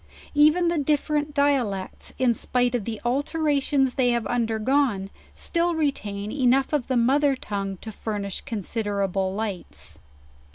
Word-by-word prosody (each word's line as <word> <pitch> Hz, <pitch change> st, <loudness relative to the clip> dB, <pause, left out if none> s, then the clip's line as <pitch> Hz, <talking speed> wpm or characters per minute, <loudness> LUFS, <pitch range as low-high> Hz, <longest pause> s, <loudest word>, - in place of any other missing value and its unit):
Even 305 Hz, +4 st, +5 dB
the 335 Hz, -2 st, +1 dB
differ 300 Hz, +1 st, 0 dB
ent 295 Hz, 0 st, -2 dB
dialects, 270 Hz, -10 st, 0 dB
in 250 Hz, -2 st, +3 dB
spite 245 Hz, +2 st, 0 dB
of 235 Hz, -5 st, -1 dB
the 225 Hz, -2 st, -4 dB
alterations 280 Hz, 0 st, +1 dB
they 255 Hz, -3 st, +2 dB
have 235 Hz, -2 st, 0 dB
undergone, 225 Hz, -2 st, 0 dB, 0.2 s
still 340 Hz, 0 st, 0 dB
retain 210 Hz, -10 st, -2 dB
enough 265 Hz, +1 st, +2 dB
of 290 Hz, -5 st, 0 dB
the 260 Hz, -, +1 dB
mother 275 Hz, +4 st, +3 dB
tongue 195 Hz, -5 st, -4 dB
to 220 Hz, -, -7 dB
furnish 205 Hz, -2 st, -4 dB
considera 205 Hz, -3 st, -2 dB
ble 190 Hz, 0 st, 0 dB
lights. 205 Hz, -4 st, -6 dB
245 Hz, 140 wpm, -25 LUFS, 210-285 Hz, 0.2 s, Even